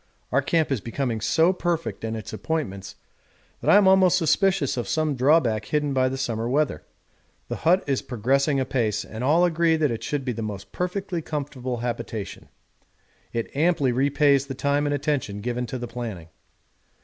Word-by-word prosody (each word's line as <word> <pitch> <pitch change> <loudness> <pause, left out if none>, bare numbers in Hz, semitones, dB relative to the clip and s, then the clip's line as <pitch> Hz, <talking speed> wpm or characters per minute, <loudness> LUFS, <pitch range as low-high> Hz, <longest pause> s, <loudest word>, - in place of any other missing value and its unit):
Our 140 - +3
camp 160 +2 +1
is 130 -6 0
becoming 120 -1 -3
so 165 - +3
perfect 175 -6 -2
in 110 0 -2
its 110 - -7
appointments 100 - -4 0.6
that - - -1
I - - +7
am 205 -2 +6
almost 190 -2 +5
suspicious 185 -2 +2
of 120 - -3
some 155 -2 0
drawback 125 -5 +3
hidden 150 -2 0
by 130 -1 +2
the 135 - -4
summer 115 -3 -2
weather. 145 - 0 0.7
The - - -3
hut 180 +4 +3
is 135 -2 0
progressing 135 +4 +1
apace, 110 -5 -1
and 110 +2 -7
all 160 +6 +4
agree 165 -1 +2
that 155 -4 +1
it 115 - -4
should 145 -3 -2
be 125 - 0
the 115 - -5
most 105 -2 -6
perfectly 180 -1 -3
comfortable 135 -5 -4
habitation. 115 -3 -5 0.8
'It 115 +2 -4
amply 150 -3 +2
repays 140 +1 +2
the 135 - -5
time 145 +2 +1
and 145 - +1
attention 140 -8 -2
given 120 +3 -3
to 130 - -4
the 120 -1 -5
planning.' 115 -9 -6
135 Hz, 175 wpm, -24 LUFS, 120-155 Hz, 0.8 s, I